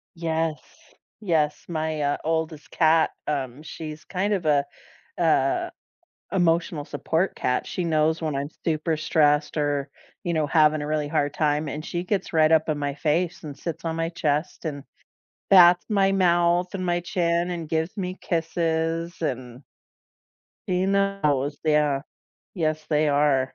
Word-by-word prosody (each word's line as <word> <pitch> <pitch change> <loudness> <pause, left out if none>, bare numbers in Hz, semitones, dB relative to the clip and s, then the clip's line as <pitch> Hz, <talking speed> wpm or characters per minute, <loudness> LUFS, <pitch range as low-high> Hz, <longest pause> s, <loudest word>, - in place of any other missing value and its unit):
Yes. 165 -2 -1 0.6
Yes, 155 -6 0
my, 155 -2 -2
uh, 145 0 +1
oldest 160 -1 -2
cat, 160 -1 +3 0.2
um, 135 -1 -3
she's 155 -1 -8
kind 200 +3 -1
of 185 -5 -2
a 145 -2 +3 0.5
a 155 -5 +2 0.6
emotional 170 -4 +1
support 165 +4 -1
cat, 125 - -1
she 180 - -3
knows 160 0 +1
when 155 -2 -1
I'm 140 +1 -2 0.2
super 160 0 0
stressed 150 -1 +2
or, 145 -2 -1 0.3
you 175 - -1
know, 155 -2 +1
having 155 0 +4
a - - -4
really 150 -1 -1
hard 145 0 0
time, 150 0 +1
and 150 +2 -5
she 175 0 -3
gets 190 0 -2
right 155 -1 +4
up 160 0 +3
in 155 -1 0
my 145 -1 -2
face 160 +4 -1
and 145 -2 -7
sits 170 -1 -5
on 165 -1 -2
my 165 0 -1
chest 155 +1 -2
and 145 -3 -4 0.7
bats 175 -2 +7
my 195 -3 +3
mouth 175 -1 +2
and 185 -1 -3
my 175 0 +1
chin 170 0 0
and 170 -3 -5
gives 160 +2 -1
me 185 -2 -3
kisses 165 0 -1
and 125 -3 -4 1.1
she 180 0 +1
knows, 190 -8 +1
yeah. 150 -3 +2 0.5
Yes, 155 -4 -1
they 150 -1 +2
are. 140 -2 +2
160 Hz, 155 wpm, -25 LUFS, 150-175 Hz, 1.1 s, bats